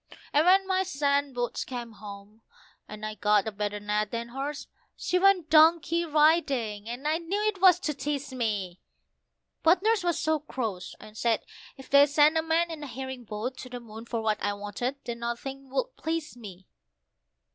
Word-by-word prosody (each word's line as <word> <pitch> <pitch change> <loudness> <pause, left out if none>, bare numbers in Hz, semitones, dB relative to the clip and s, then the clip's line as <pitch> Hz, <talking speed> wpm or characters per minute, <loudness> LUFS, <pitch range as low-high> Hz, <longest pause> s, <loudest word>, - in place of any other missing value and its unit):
And 300 +4 +4
when 385 +1 +6
my 375 0 +1
sand 285 -6 0
boots 245 -1 -2
came 240 -2 -6
home, 205 0 -11 0.5
and 210 0 -7
I'd 215 0 -7
got 210 0 +3
a - - -1
better 205 0 -3
net 210 0 -1
than 235 +1 -4
hers, 275 +4 -5 0.3
she 360 - 0
went 370 -5 +3
donkey 330 +1 +5
riding, 280 -9 +2
and 250 +5 -4
I 315 +2 +1
knew 355 +4 -2
it 395 -4 -2
was 365 -2 +7
to 305 - -1
tease 280 0 -4
me, 205 -7 -2 0.8
But 345 +3 +4
Nurse 440 -3 +2
was 345 -2 +1
so 315 0 +1
cross, 225 -11 -5
and 215 - -13
said 230 0 +1 0.3
if 270 - -12
they 280 +1 +6
sent 300 +2 +4
a 320 - +3
man 325 +1 +1
in 315 -2 -7
a 290 - -6
herring 260 -1 -7
boat 220 +5 -4
to 255 - -9
the 245 0 -6
moon 225 -1 -10
for 230 -1 -3
what 215 -1 0
I 205 - 0
wanted 205 +6 -4
that 235 -2 -4
nothing 265 +3 -5
would - - -2
please 320 -3 -3
me. 195 -6 -11
265 Hz, 190 wpm, -28 LUFS, 220-320 Hz, 0.8 s, was